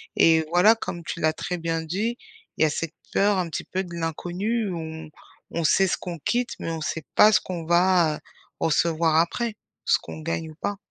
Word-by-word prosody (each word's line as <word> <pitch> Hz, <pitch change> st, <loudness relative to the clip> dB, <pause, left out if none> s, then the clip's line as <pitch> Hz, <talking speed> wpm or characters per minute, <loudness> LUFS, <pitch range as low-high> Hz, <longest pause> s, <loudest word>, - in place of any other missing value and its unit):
Et 160 Hz, -1 st, +5 dB
voilà, 180 Hz, +6 st, +6 dB
comme 175 Hz, -6 st, -6 dB
tu 170 Hz, -, -5 dB
l'as 155 Hz, -1 st, +2 dB
très 180 Hz, +2 st, -4 dB
bien 165 Hz, -1 st, -2 dB
dit, 205 Hz, +9 st, -2 dB, 0.4 s
il -, -, +3 dB
y -, -, +7 dB
a -, -, +2 dB
cette 165 Hz, +2 st, -3 dB, 0.2 s
peur 200 Hz, 0 st, +3 dB
un 175 Hz, -2 st, -1 dB
petit -, -, -4 dB
peu 190 Hz, +1 st, -2 dB
de 175 Hz, -2 st, -10 dB
l'inconnu, 180 Hz, +7 st, -2 dB
où 170 Hz, -, -4 dB
on 160 Hz, -1 st, -7 dB, 0.5 s
on 170 Hz, -, 0 dB
sait 190 Hz, +5 st, +4 dB
ce -, -, 0 dB
qu'on 175 Hz, -2 st, -6 dB
quitte 240 Hz, +10 st, 0 dB
mais 165 Hz, -, -3 dB
on 160 Hz, -1 st, -4 dB
sait 160 Hz, +1 st, -3 dB
pas 215 Hz, -, +8 dB
ce -, -, +5 dB
qu'on 175 Hz, -3 st, -5 dB
va, 175 Hz, -2 st, +4 dB
heu, -, -, -14 dB, 0.4 s
recevoir 165 Hz, 0 st, +2 dB
après. 210 Hz, +7 st, +1 dB, 0.3 s
Ce -, -, +4 dB
qu'on -, -, -8 dB
gagne 165 Hz, 0 st, -3 dB
ou -, -, -15 dB
pas. 205 Hz, -, -2 dB
170 Hz, 220 wpm, -25 LUFS, 160-190 Hz, 0.5 s, pas